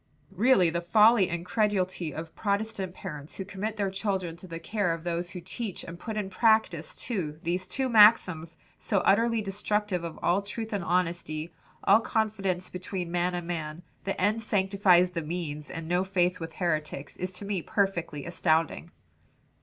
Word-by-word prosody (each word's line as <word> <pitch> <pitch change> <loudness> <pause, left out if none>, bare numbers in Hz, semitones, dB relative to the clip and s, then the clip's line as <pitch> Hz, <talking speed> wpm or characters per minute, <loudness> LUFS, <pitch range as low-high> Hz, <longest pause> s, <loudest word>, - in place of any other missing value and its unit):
"Really 210 -8 +4
the 170 +1 -1
folly 210 +2 +5
and 170 0 -3
credulity 185 -5 0
of 160 +3 -7
Protestant 200 -2 -2
parents 150 -6 -8
who 190 - -5
commit 205 +2 -4
their 200 -3 -1
children 190 -4 -2
to 185 - -12
the 165 -1 -6
care 180 0 -1
of 165 - -11
those 175 0 -2
who 180 0 -7
teach 190 +3 -5
and 170 +1 -9
put 220 +2 -5
in 200 -2 -3
practice, 220 -6 +2
too, 175 -11 -3
these 180 +2 -1
two 265 +8 -1
maxims, 205 -8 +5 0.2
so 200 -3 0
utterly 230 +2 +3
destructive 205 -2 -1
of 165 -1 -6
all 180 +3 +3
truth 220 +2 -5
and 200 -3 -1
honesty, 170 -2 -1 0.3
all 200 +3 +6
confidence 200 -5 -1
between 180 -1 -5
man 175 +1 0
and 175 -1 -4
man 165 -1 -4 0.2
'The 195 - -2
end 210 +4 +2
sanctifies 190 -3 +3
the 170 -2 -2
means,' 150 -2 -4
and 165 -1 -6
'No 180 +2 +2
faith 180 -2 +1
with 165 -1 -6
heretics,' 155 -5 -2
is 185 +1 -3
to 190 +3 -7
me 195 -3 -1
perfectly 170 -7 -1
astounding." 165 -1 0
185 Hz, 170 wpm, -28 LUFS, 170-205 Hz, 0.3 s, all